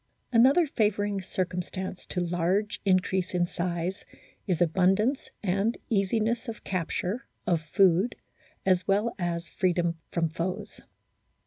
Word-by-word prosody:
Another 265 Hz, +9 st, +6 dB
favouring 205 Hz, -6 st, 0 dB
circumstance 185 Hz, 0 st, -4 dB
to 180 Hz, -, -2 dB
large 175 Hz, +4 st, 0 dB
increase 185 Hz, -1 st, +1 dB
in 175 Hz, -1 st, +3 dB
size 175 Hz, +2 st, -3 dB, 0.4 s
is 180 Hz, -4 st, +1 dB
abundance, 190 Hz, -, +2 dB
and 200 Hz, +4 st, +1 dB
easiness 220 Hz, +4 st, +1 dB
of 225 Hz, -1 st, -6 dB
capture, 185 Hz, -, -2 dB, 0.2 s
of 170 Hz, -3 st, +2 dB
food, 185 Hz, +6 st, +3 dB, 0.5 s
as 185 Hz, -1 st, +2 dB
well 210 Hz, +4 st, +2 dB
as 170 Hz, -1 st, -2 dB
freedom 170 Hz, -2 st, 0 dB
from 170 Hz, -1 st, +1 dB
foes. 170 Hz, +3 st, -4 dB
185 Hz, 115 wpm, -28 LUFS, 175-210 Hz, 0.5 s, Another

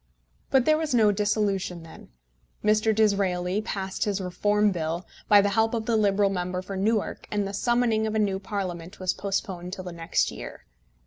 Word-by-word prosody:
But 265 Hz, -2 st, +3 dB
there 310 Hz, 0 st, +4 dB
was 310 Hz, -5 st, -1 dB
no 215 Hz, -3 st, +5 dB
dissolution 200 Hz, -4 st, -1 dB
then. 165 Hz, -, -13 dB, 0.5 s
Mr. 215 Hz, +1 st, +3 dB
Disraeli 195 Hz, -3 st, +1 dB
passed 195 Hz, -3 st, -3 dB
his 205 Hz, -2 st, -1 dB
Reform 205 Hz, +3 st, +1 dB
Bill, 170 Hz, 0 st, -3 dB, 0.2 s
by 205 Hz, -1 st, +7 dB
the 205 Hz, -, +1 dB
help 225 Hz, +2 st, +2 dB
of 225 Hz, -1 st, -3 dB
the 230 Hz, -, +1 dB
Liberal 200 Hz, -2 st, +3 dB
member 180 Hz, 0 st, -3 dB
for 195 Hz, -, -6 dB
Newark, 210 Hz, +2 st, -1 dB
and 205 Hz, -1 st, -1 dB
the 195 Hz, -, -6 dB
summoning 230 Hz, 0 st, +1 dB
of 215 Hz, -, -3 dB
a -, -, +2 dB
new 200 Hz, -3 st, +1 dB
Parliament 185 Hz, -4 st, -5 dB
was 185 Hz, -1 st, 0 dB
postponed 190 Hz, -2 st, -3 dB
till 185 Hz, -, -6 dB
the 180 Hz, -, -6 dB
next 165 Hz, 0 st, 0 dB
year. -, -, -9 dB
200 Hz, 185 wpm, -26 LUFS, 185-215 Hz, 0.5 s, by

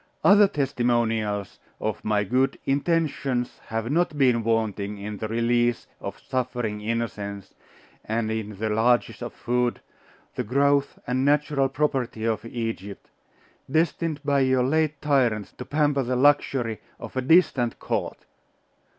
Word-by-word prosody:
Other 205 Hz, +1 st, +7 dB
testimonials 120 Hz, -, 0 dB, 0.2 s
of -, -, -3 dB
my 105 Hz, -1 st, +1 dB
good 130 Hz, +6 st, +1 dB
intentions 140 Hz, -4 st, 0 dB
have 115 Hz, +2 st, -3 dB
not 165 Hz, -1 st, +1 dB
been 125 Hz, -4 st, +3 dB
wanting 105 Hz, -2 st, -1 dB
in 105 Hz, +1 st, -6 dB
the 110 Hz, -, -3 dB
release 120 Hz, +1 st, +1 dB
of -, -, -6 dB
suffering 120 Hz, -5 st, -3 dB
innocence, 105 Hz, -3 st, -4 dB, 0.5 s
and 110 Hz, 0 st, -1 dB
in 105 Hz, -2 st, -4 dB
the 110 Hz, +1 st, -1 dB
largess 120 Hz, +4 st, +2 dB
of 120 Hz, -, -4 dB
food, 125 Hz, 0 st, -1 dB, 0.5 s
the -, -, -2 dB
growth 140 Hz, +4 st, +2 dB
and 130 Hz, +1 st, 0 dB
natural 145 Hz, -1 st, +2 dB
property 130 Hz, -5 st, -1 dB
of 115 Hz, -1 st, 0 dB
Egypt, 115 Hz, -4 st, -5 dB, 0.6 s
destined 160 Hz, +1 st, 0 dB
by 140 Hz, -1 st, +3 dB
your 130 Hz, -1 st, +3 dB
late 155 Hz, +2 st, +1 dB
tyrants 125 Hz, -8 st, +1 dB
to 125 Hz, -, -9 dB
pamper 145 Hz, -1 st, +1 dB
the 125 Hz, 0 st, -1 dB
luxury 130 Hz, -4 st, +2 dB, 0.2 s
of -, -, -9 dB
a 130 Hz, -, 0 dB
distant 140 Hz, -5 st, +3 dB
court.... -, -, -3 dB
125 Hz, 135 wpm, -25 LUFS, 110-140 Hz, 0.6 s, Other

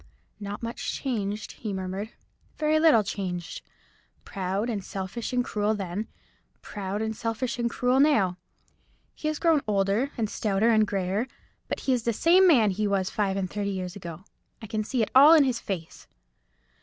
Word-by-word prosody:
"Not 205 Hz, +2 st, -6 dB
much 230 Hz, +1 st, -4 dB
changed," 210 Hz, -6 st, -3 dB
he 215 Hz, -, -6 dB
murmured; 190 Hz, +3 st, -4 dB, 0.5 s
"very 310 Hz, 0 st, +2 dB
little 310 Hz, -9 st, +5 dB
changed! 180 Hz, -4 st, -4 dB, 0.6 s
Proud, 195 Hz, +2 st, -2 dB
and 210 Hz, -5 st, -3 dB
selfish, 195 Hz, +4 st, -5 dB
and 250 Hz, -1 st, 0 dB
cruel 210 Hz, +1 st, 0 dB
then—proud, 200 Hz, +1 st, -6 dB
and 220 Hz, 0 st, -3 dB
selfish, 230 Hz, +3 st, -3 dB
and 235 Hz, 0 st, +1 dB
cruel 250 Hz, +2 st, +1 dB
now. 210 Hz, -12 st, +3 dB, 0.7 s
He 305 Hz, -, -5 dB
has 310 Hz, 0 st, -1 dB
grown 325 Hz, -3 st, +3 dB
older, 200 Hz, +5 st, +1 dB
and 225 Hz, -2 st, 0 dB
stouter, 210 Hz, +2 st, +1 dB
and 215 Hz, -1 st, +4 dB
greyer; 195 Hz, +4 st, -1 dB, 0.4 s
but -, -, -4 dB
he 265 Hz, -, +1 dB
is 245 Hz, -, +1 dB
the 235 Hz, +1 st, 0 dB
same 360 Hz, -, +5 dB
man 235 Hz, -, +5 dB
he 210 Hz, +3 st, -1 dB
was 195 Hz, -2 st, 0 dB
five 195 Hz, -2 st, 0 dB
and 190 Hz, -1 st, -1 dB
thirty 200 Hz, +2 st, -3 dB
years 185 Hz, -1 st, -4 dB
ago. 170 Hz, -2 st, -8 dB, 0.4 s
I 225 Hz, -, -9 dB
can 215 Hz, 0 st, -2 dB
see 235 Hz, +1 st, 0 dB
it -, -, -4 dB
all 290 Hz, +5 st, +9 dB
in 305 Hz, -, +6 dB
his 255 Hz, -3 st, 0 dB
face." 175 Hz, -6 st, -6 dB
215 Hz, 170 wpm, -26 LUFS, 195-245 Hz, 0.7 s, all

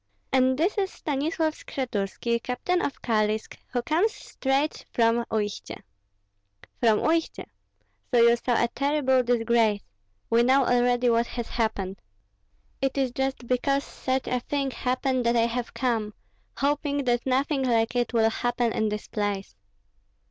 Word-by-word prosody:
"And 260 Hz, 0 st, +3 dB
this 365 Hz, +7 st, +1 dB
is 385 Hz, -1 st, 0 dB
Stanislav 310 Hz, +2 st, -1 dB
Skshetuski, 235 Hz, -3 st, -3 dB
captain 305 Hz, +10 st, -1 dB
of 280 Hz, -, -4 dB
Kalisk, 215 Hz, -1 st, 0 dB
who 245 Hz, -1 st, -2 dB
comes 345 Hz, -, +2 dB
straight 275 Hz, -5 st, -2 dB
from 235 Hz, 0 st, +2 dB
Uistsie." 210 Hz, -2 st, -3 dB, 1.0 s
"From 225 Hz, -3 st, +3 dB
Uistsie? 325 Hz, 0 st, 0 dB, 0.6 s
So 245 Hz, -, +3 dB
you 235 Hz, 0 st, +6 dB
saw 240 Hz, 0 st, +1 dB
a -, -, +3 dB
terrible 275 Hz, -1 st, +2 dB
disgrace. 230 Hz, -3 st, +2 dB, 0.4 s
We 230 Hz, +1 st, +3 dB
know 260 Hz, +2 st, +4 dB
already 245 Hz, 0 st, +3 dB
what 230 Hz, +1 st, +2 dB
has 235 Hz, -2 st, -5 dB
happened." 200 Hz, -4 st, -2 dB, 0.8 s
"It 270 Hz, 0 st, 0 dB
is 265 Hz, -2 st, +1 dB
just 265 Hz, -1 st, -2 dB
because 275 Hz, +3 st, +1 dB
such 260 Hz, -2 st, -2 dB
a 250 Hz, -, 0 dB
thing 275 Hz, +2 st, -2 dB
happened 255 Hz, 0 st, -1 dB
that 235 Hz, -, +3 dB
I 230 Hz, -1 st, +4 dB
have 235 Hz, +1 st, -3 dB
come, 225 Hz, -5 st, -1 dB, 0.4 s
hoping 285 Hz, 0 st, 0 dB
that 240 Hz, 0 st, 0 dB
nothing 270 Hz, +2 st, +1 dB
like 235 Hz, -2 st, +1 dB
it 245 Hz, -1 st, 0 dB
will 225 Hz, -2 st, +3 dB
happen 240 Hz, 0 st, 0 dB
in 220 Hz, -1 st, 0 dB
this 210 Hz, 0 st, -5 dB
place." 205 Hz, -, -3 dB
245 Hz, 145 wpm, -26 LUFS, 230-270 Hz, 1.0 s, you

